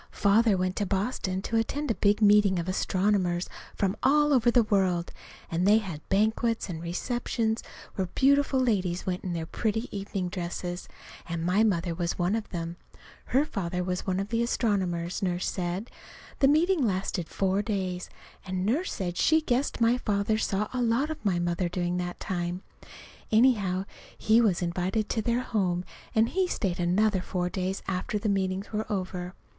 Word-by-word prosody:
Father 210 0 +4
went 185 0 -1
to 205 - 0
Boston 190 -1 -1
to 230 - 0
attend 280 +5 -1
a - - +2
big 210 +1 +2
meeting 205 -2 +5
of 170 0 -2
astronomers 185 -1 +1 0.3
from 195 0 0
all 295 +2 +4
over 245 -2 +4
the 240 0 +5
world, 185 -5 +1 0.4
and 175 +3 +1
they 210 +2 +7
had 185 -9 -4
banquets 220 +3 +1
and 165 -2 -5
receptions 225 +5 -1 0.3
where 190 -2 -2
beautiful 280 0 +3
ladies 190 -8 0
went 180 -1 -2
in 180 - -3
their 165 -1 -3
pretty 220 +6 -2
evening 195 -2 -3
dresses, 175 0 -4 0.4
and 165 0 -2
my 190 +5 +3
mother 175 -5 +1
was 170 0 -2
one 180 +4 +1
of 225 -2 -4
them. 170 -1 -5 0.5
(Her 270 +4 +2
father 180 - -3
was 180 +1 -3
one 185 0 0
of 195 +1 -3
the 230 0 0
astronomers, 190 -8 0
Nurse 180 -2 -1
said.) 180 +5 -3 0.5
The 270 - +5
meetings 325 +4 +3
lasted 185 -5 -1
four 195 +1 +1
days, 190 -4 -3 0.3
and 185 -1 -3
Nurse 290 - 0
said 175 -2 -3
she 315 0 +4
guessed 275 -2 -1
my 235 +2 +4
father 210 0 0
saw 210 -1 0
a 255 - -1
lot 240 +6 +1
of 315 - -7
my 195 -4 +1
mother 175 +1 0
during 175 0 -1
that 175 0 -4
time. 175 -1 -3 0.7
Anyhow, 210 -5 +3 0.3
he 220 +2 +4
was 195 -5 +2
invited 185 +5 -1
to 220 - 0
their 235 +3 0
home, 185 -7 -1 0.3
and 225 +1 +4
he 375 0 +1
stayed 185 - -2
another 190 +3 +2
four 180 -1 -2
days 190 +1 -2
after 190 +2 -2
the 210 +1 -1
meetings 195 +1 -1
were 215 +1 -2
over. 185 -2 -3
195 Hz, 175 wpm, -28 LUFS, 180-225 Hz, 0.7 s, they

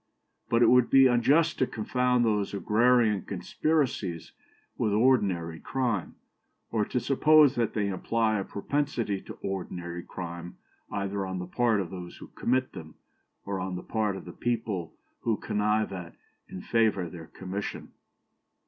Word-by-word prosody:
But 115 0 +4
it - - +6
would 125 -1 +5
be 135 0 +7
unjust 140 +7 +3
to 130 - +3
confound 125 +2 +1
these 105 -2 0
agrarian 110 0 +3
conspiracies 135 - -1 0.4
with 105 - 0
ordinary 100 -9 +2
crime, 120 -8 -2 0.6
or 110 -2 +1
to 125 - -1
suppose 150 +1 +5
that 120 -4 -1
they 105 -2 +1
imply 110 +3 0
a - - -2
propensity 115 -2 -2
to - - -10
ordinary 90 -2 -4
crime 85 -1 -7 0.3
either 100 0 -2
on 95 -1 -4
the 90 - -4
part 115 +3 +1
of 90 -4 -4
those 90 -2 -8
who - - -11
commit 130 +1 0
them, 80 -5 -10 0.5
or 100 -1 -3
on 90 0 -3
the 90 - -6
part 105 -3 -1
of - - -8
the 85 - -9
people 110 -8 -2 0.2
who 115 -3 0
connive 105 0 0
at 90 -3 -7 0.3
and 90 - -8
favour 110 -6 +2
their 80 -1 -10
commission. 95 +2 -6
105 Hz, 150 wpm, -28 LUFS, 95-120 Hz, 0.6 s, be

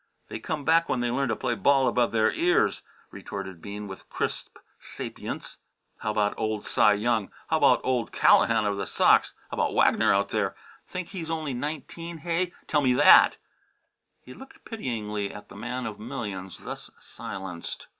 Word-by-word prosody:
"They - - -5
come 145 +5 -4
back 165 +1 +4
when 125 - 0
they 120 -1 0
learn 135 +1 0
to 110 - +1
play 120 - -1
ball 135 +5 +3
above 120 -1 +2
the 110 -1 +3
ears," 175 +1 +2 0.3
retorted 95 -3 -7
Bean 105 +2 -7
with 95 -1 -10
crisp - - -4 0.2
sapience. - - -7 0.4
"How 110 - -3
about 105 -1 +1
old 110 -1 -2
Cy 105 - +4
Young? 110 -1 0 0.2
How - - +4
about - - +4
old 125 -3 0
Callahan 110 -2 +4
of 100 -1 0
the 100 - -3
Sox? - - +4 0.2
How - - -5
about - - 0
Wagner - - +4
out 100 0 +2
there 100 -3 -1 0.3
think 185 -2 -5
he's 170 -5 -6
only 160 -4 -2
nineteen 155 +5 -5
hey? 170 +3 -1
Tell 150 - +2
me 130 -3 +3
that!" - - +7 0.8
He 125 - -13
looked 270 - -14
pityingly 105 - -3
at 105 - -11
the - - -12
man 120 +4 -4
of 110 -2 -6
millions 100 -4 -6
thus - - -7
silenced. 95 -3 -7
115 Hz, 175 wpm, -27 LUFS, 105-145 Hz, 0.8 s, that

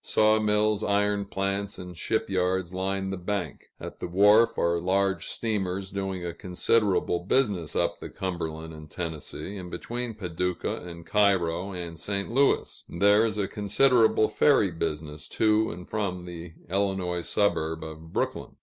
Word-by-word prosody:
Saw 110 0 +3
mills, 105 0 +2
iron 105 0 +1
plants, 100 +1 -2
and 90 -1 -8
ship 110 +6 -1
yards 95 -1 0
line 95 +1 -2
the 95 - -3
bank; 90 -3 -4
at - - -8
the - - -4
wharf 105 +6 +5
are 85 0 +2
large 95 0 +1
steamers 95 -4 -2
doing 95 -2 -3
a 85 - -3
considerable 90 0 +1
business 95 - 0
up - - 0
the - - -7
Cumberland 80 -3 -4
and 75 -1 -11
Tennessee, 85 +4 -5
and 90 -2 -7
between 120 +3 -4
Paducah 90 -2 -2
and 85 -1 -9
Cairo 95 -3 +2
and 85 -2 -6
St. 100 +5 -3
Louis; 135 +3 +1
and - - -7
there 100 +2 +6
is 110 -2 -2
a 100 -2 0
considerable 110 +2 +3
ferry 120 -10 +3
business 75 -2 -4
to 110 0 +3
and 90 +1 -8
from 95 -5 -2
the 85 -1 -8
Illinois 95 -2 0
suburb 80 -5 0
of 80 0 -9
Brooklyn. - - -2
95 Hz, 155 wpm, -27 LUFS, 85-105 Hz, -, there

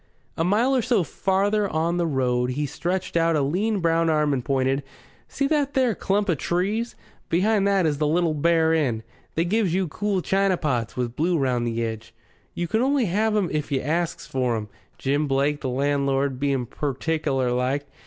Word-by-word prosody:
A 165 - 0
mile 225 +9 +2
or 255 - +3
so 235 -5 +2
farther 200 +6 0
on 165 +2 0
the 170 -1 +1
road 125 -4 0
he 145 +4 -1
stretched 180 +6 -3
out 165 -1 +3
a 150 - +2
lean 195 +8 0
brown 165 0 +2
arm 150 -2 +2
and 130 -3 -1
pointed. 135 +1 +1 0.5
"See 275 - -2
that 290 -2 0
there 255 -4 +3
clump 205 +1 0
of 165 -7 0
trees? 205 +7 -1 0.3
Behind 200 +3 +2
that 195 -3 +3
is 145 -2 0
the 150 - +2
Little 165 +1 +2
Bear 160 +1 +2
Inn. 125 -9 0 0.3
They 165 - +1
gives 190 -2 +1
you 190 -1 +1
cool 195 +3 -1
china 195 -1 +2
pots 125 -10 -2
with 120 -1 -2
blue 170 +3 +1
round 125 -4 0
the 115 0 -1
edge. 110 0 -7 0.4
You 175 - -2
can 220 +6 +1
only 270 -1 +2
have 215 +4 +1
'em 190 -5 +1
if 150 -1 -2
you 135 - +1
asks 165 +5 -2
for 125 -3 -1
'em, 105 -1 -6 0.3
Jim 145 +2 0
Blake, 140 +2 +1
the 130 - -2
landlord, 140 0 0
being 135 -3 0
pertickler 135 0 -1
like. 130 +3 0
160 Hz, 195 wpm, -24 LUFS, 135-190 Hz, 0.5 s, or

